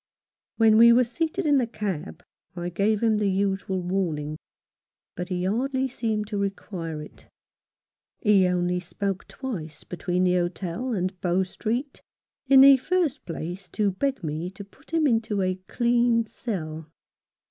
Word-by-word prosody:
When 220 Hz, -1 st, +5 dB
we 235 Hz, 0 st, +9 dB
were 245 Hz, +2 st, +6 dB
seated 325 Hz, +9 st, -2 dB
in 290 Hz, -2 st, +4 dB
the 245 Hz, -, 0 dB
cab 195 Hz, -7 st, -5 dB, 0.3 s
I 175 Hz, 0 st, -3 dB
gave 205 Hz, +5 st, +1 dB
him 220 Hz, -2 st, +3 dB
the 205 Hz, -1 st, +1 dB
usual 195 Hz, -1 st, -1 dB
warning, 160 Hz, -5 st, -2 dB, 0.8 s
but 180 Hz, +1 st, -5 dB
he 180 Hz, -1 st, -2 dB
hardly 260 Hz, +6 st, 0 dB
seemed 220 Hz, -3 st, -2 dB
to 205 Hz, -2 st, -2 dB
require 175 Hz, -5 st, -4 dB
it. -, -, -15 dB, 0.9 s
He 200 Hz, -4 st, +4 dB
only 180 Hz, 0 st, 0 dB
spoke 195 Hz, +2 st, -4 dB
twice 165 Hz, -, -6 dB
between 180 Hz, 0 st, -2 dB
the 180 Hz, -1 st, +3 dB
hotel 180 Hz, +7 st, -2 dB
and 185 Hz, -3 st, -2 dB
Bow 180 Hz, +1 st, +2 dB
Street, 235 Hz, +8 st, -4 dB, 0.5 s
in 265 Hz, 0 st, +8 dB
the 275 Hz, 0 st, +9 dB
first 330 Hz, 0 st, -1 dB
place 175 Hz, +3 st, -6 dB
to 210 Hz, -2 st, 0 dB
beg 270 Hz, +6 st, -2 dB
me 155 Hz, +3 st, -3 dB
to 195 Hz, +2 st, -10 dB
put 200 Hz, -, -21 dB
him 325 Hz, -2 st, +2 dB
into 225 Hz, -6 st, +1 dB
a 185 Hz, 0 st, -2 dB
clean 235 Hz, -1 st, +2 dB
cell. 160 Hz, -9 st, -5 dB
200 Hz, 150 wpm, -25 LUFS, 180-235 Hz, 0.9 s, we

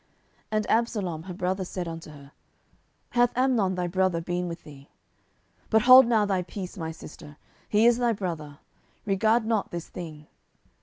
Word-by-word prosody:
10:013:020 -, -, -40 dB, 0.5 s
And 215 Hz, -, -2 dB
Absalom 205 Hz, -8 st, 0 dB
her 185 Hz, -, -6 dB
brother 185 Hz, +1 st, -1 dB
said 180 Hz, -1 st, -5 dB
unto 165 Hz, -1 st, -7 dB
her, 140 Hz, -2 st, -14 dB, 0.8 s
Hath 245 Hz, 0 st, +2 dB
Amnon 240 Hz, -8 st, +2 dB
thy 180 Hz, -1 st, -1 dB
brother 185 Hz, -1 st, +1 dB
been 175 Hz, +1 st, -3 dB
with 170 Hz, 0 st, -7 dB
thee? 140 Hz, -2 st, -14 dB, 0.8 s
but 220 Hz, 0 st, +3 dB
hold 255 Hz, 0 st, +9 dB
now 220 Hz, -3 st, +3 dB
thy 195 Hz, -2 st, 0 dB
peace, 180 Hz, +2 st, -7 dB
my 165 Hz, -4 st, -4 dB
sister: 155 Hz, -2 st, -11 dB, 0.3 s
he 215 Hz, +2 st, +3 dB
is 240 Hz, 0 st, +5 dB
thy 240 Hz, -1 st, +2 dB
brother; 165 Hz, -8 st, -5 dB, 0.5 s
regard 220 Hz, +3 st, +2 dB
not 220 Hz, -2 st, 0 dB
this 170 Hz, -1 st, -6 dB
thing. 155 Hz, -4 st, -8 dB
185 Hz, 165 wpm, -26 LUFS, 165-220 Hz, 0.8 s, hold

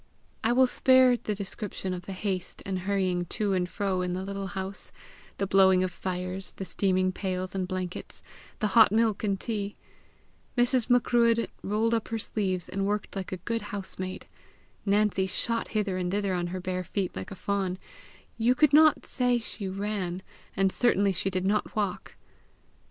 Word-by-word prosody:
I 225 Hz, -, +3 dB
will 260 Hz, +2 st, +6 dB
spare 255 Hz, 0 st, +5 dB
the 215 Hz, -3 st, -3 dB
description 195 Hz, -1 st, -4 dB
of 180 Hz, -1 st, -7 dB
the 195 Hz, -, -4 dB
haste 185 Hz, -1 st, -4 dB
and 190 Hz, -1 st, -2 dB
hurrying 185 Hz, -2 st, 0 dB
to 205 Hz, +3 st, -1 dB
and 180 Hz, -1 st, 0 dB
fro 190 Hz, -2 st, -1 dB
in 180 Hz, 0 st, -1 dB
the 185 Hz, +1 st, -3 dB
little 195 Hz, 0 st, -4 dB
house 190 Hz, 0 st, -5 dB, 0.5 s
the 195 Hz, -, 0 dB
blowing 190 Hz, -1 st, +5 dB
of 185 Hz, -, -1 dB
fires, 185 Hz, +1 st, -4 dB
the 195 Hz, -, -6 dB
steaming 185 Hz, -1 st, +2 dB
pails 185 Hz, -1 st, -3 dB
and 190 Hz, -2 st, -2 dB
blankets, 185 Hz, -1 st, -5 dB, 0.3 s
the 210 Hz, -, 0 dB
hot 225 Hz, -4 st, +7 dB
milk 220 Hz, -1 st, +2 dB
and 200 Hz, -2 st, 0 dB
tea! 205 Hz, -3 st, -3 dB, 0.8 s
Mrs. 245 Hz, 0 st, +3 dB
Macruadh 235 Hz, -1 st, +3 dB
rolled 220 Hz, +3 st, +1 dB
up 225 Hz, -2 st, 0 dB
her 225 Hz, -, -2 dB
sleeves, 190 Hz, -5 st, -2 dB
and 195 Hz, +1 st, -2 dB
worked 205 Hz, 0 st, -2 dB
like 195 Hz, -1 st, -4 dB
a 185 Hz, -, -3 dB
good 230 Hz, +6 st, -2 dB
housemaid. 190 Hz, -2 st, -5 dB, 0.6 s
Nancy 200 Hz, -1 st, +2 dB
shot 230 Hz, +5 st, -1 dB
hither 205 Hz, -4 st, -1 dB
and 180 Hz, -1 st, -1 dB
thither 200 Hz, -1 st, 0 dB
on 175 Hz, -1 st, -1 dB
her 185 Hz, +1 st, -4 dB
bare 185 Hz, 0 st, -3 dB
feet 185 Hz, +1 st, -3 dB
like -, -, -5 dB
a 200 Hz, -, -7 dB
fawn 190 Hz, -1 st, -1 dB, 0.6 s
you 240 Hz, +3 st, +4 dB
could 290 Hz, +2 st, +4 dB
not 310 Hz, +1 st, +6 dB
say 245 Hz, -2 st, +2 dB
she 220 Hz, -3 st, -5 dB
ran, 190 Hz, -2 st, -3 dB, 0.3 s
and 195 Hz, -1 st, +3 dB
certainly 200 Hz, -4 st, +3 dB
she 190 Hz, +1 st, 0 dB
did 185 Hz, 0 st, -2 dB
not 205 Hz, +2 st, 0 dB
walk. 205 Hz, -4 st, -2 dB
195 Hz, 175 wpm, -28 LUFS, 185-215 Hz, 0.8 s, hot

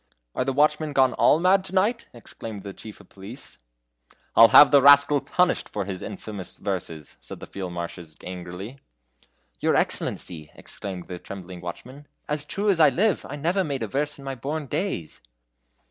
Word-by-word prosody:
"Are -, -, -1 dB
the 135 Hz, -, -1 dB
watchmen 150 Hz, +2 st, +1 dB
gone 130 Hz, -2 st, +3 dB
all -, -, +4 dB
mad 185 Hz, +2 st, +4 dB
to 190 Hz, -, -7 dB
night?" 220 Hz, +5 st, +1 dB
exclaimed 110 Hz, -3 st, -8 dB
the 100 Hz, -1 st, -7 dB
chief 110 Hz, +1 st, -11 dB
of -, -, -18 dB
police. 100 Hz, +8 st, -10 dB, 0.8 s
"I'll 115 Hz, -, +9 dB
have 145 Hz, -, +8 dB
the 140 Hz, -1 st, +6 dB
rascal 145 Hz, +1 st, +6 dB
punished 180 Hz, 0 st, 0 dB
for 100 Hz, -2 st, -3 dB
his 95 Hz, -2 st, -5 dB
infamous 100 Hz, -4 st, -7 dB
verses," 85 Hz, -6 st, -5 dB
said -, -, -9 dB
the -, -, -8 dB
Field 95 Hz, -2 st, -6 dB
Marshal 85 Hz, 0 st, -6 dB, 0.2 s
angrily. 90 Hz, +7 st, -8 dB, 0.8 s
"Your -, -, +1 dB
excellency," 80 Hz, -4 st, -2 dB
exclaimed 95 Hz, -3 st, -8 dB
the 90 Hz, -2 st, -7 dB
trembling 90 Hz, -2 st, -9 dB
watchman, 130 Hz, +11 st, -9 dB, 0.2 s
"as 150 Hz, 0 st, -3 dB
true 200 Hz, +6 st, 0 dB
as 180 Hz, -, 0 dB
I 155 Hz, -, +7 dB
live, 205 Hz, 0 st, 0 dB
I 145 Hz, -, -5 dB
never 170 Hz, +7 st, 0 dB
made 140 Hz, -6 st, -3 dB
a -, -, -2 dB
verse 145 Hz, +6 st, -2 dB
in 140 Hz, -, -13 dB
my 135 Hz, -, -3 dB
born 145 Hz, +5 st, -4 dB
days." 140 Hz, -, -3 dB
130 Hz, 175 wpm, -24 LUFS, 95-150 Hz, 0.8 s, I'll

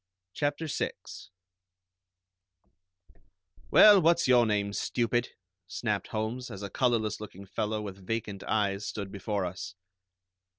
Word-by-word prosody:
CHAPTER 145 Hz, -, -1 dB
VI 155 Hz, -, -2 dB, 2.8 s
"Well, 205 Hz, -3 st, +8 dB
what's 170 Hz, -1 st, +3 dB
your 120 Hz, -2 st, +5 dB
name, 100 Hz, -1 st, 0 dB
stupid?" 120 Hz, +2 st, 0 dB, 0.4 s
snapped 105 Hz, 0 st, -2 dB
Holmes, 110 Hz, +3 st, -3 dB
as 100 Hz, +1 st, -8 dB
a 100 Hz, -, -6 dB
colorless 110 Hz, -4 st, 0 dB
looking 100 Hz, -2 st, -9 dB
fellow 105 Hz, +2 st, -2 dB
with 100 Hz, -2 st, -8 dB
vacant 105 Hz, -4 st, -3 dB
eyes 100 Hz, -2 st, 0 dB
stood 100 Hz, -2 st, -5 dB
before 100 Hz, -1 st, -2 dB
us. 90 Hz, +1 st, -6 dB
105 Hz, 115 wpm, -29 LUFS, 100-120 Hz, 2.8 s, Well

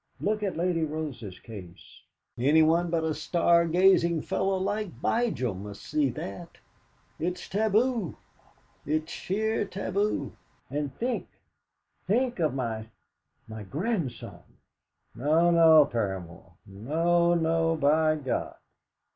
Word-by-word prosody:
Look 210 Hz, +1 st, -1 dB
at 195 Hz, -5 st, -2 dB
Lady 170 Hz, -1 st, 0 dB
Rose's 145 Hz, -11 st, -5 dB
case! 95 Hz, -5 st, -12 dB, 0.3 s
Anyone 160 Hz, +6 st, +3 dB
but 165 Hz, -1 st, 0 dB
a 160 Hz, -1 st, 0 dB
star 170 Hz, +2 st, +2 dB
gazing 170 Hz, -1 st, +3 dB
fellow 190 Hz, 0 st, 0 dB
like 205 Hz, +3 st, -1 dB
Vigil 145 Hz, -, 0 dB
must 100 Hz, +2 st, -9 dB
see 150 Hz, -3 st, +1 dB
that! 100 Hz, -5 st, -7 dB, 0.6 s
It's 180 Hz, +2 st, -3 dB
taboo! 220 Hz, -, +1 dB, 0.7 s
It's 155 Hz, +2 st, -2 dB
sheer 220 Hz, +4 st, -1 dB
taboo! 195 Hz, -5 st, -2 dB, 0.4 s
And 145 Hz, 0 st, -2 dB
think 245 Hz, +2 st, -2 dB, 0.8 s
think 240 Hz, +3 st, +1 dB
of 155 Hz, -5 st, +1 dB
my 110 Hz, -4 st, -3 dB, 0.6 s
my 110 Hz, 0 st, -8 dB
grandson! 150 Hz, -, -4 dB, 0.7 s
No, 155 Hz, +8 st, +3 dB
no, 160 Hz, -3 st, +7 dB
Paramor; 95 Hz, -8 st, -4 dB
no, 165 Hz, -, +1 dB
no, 165 Hz, 0 st, +1 dB
by 155 Hz, +1 st, +3 dB
God!" 140 Hz, -4 st, -3 dB
160 Hz, 110 wpm, -27 LUFS, 135-185 Hz, 0.8 s, no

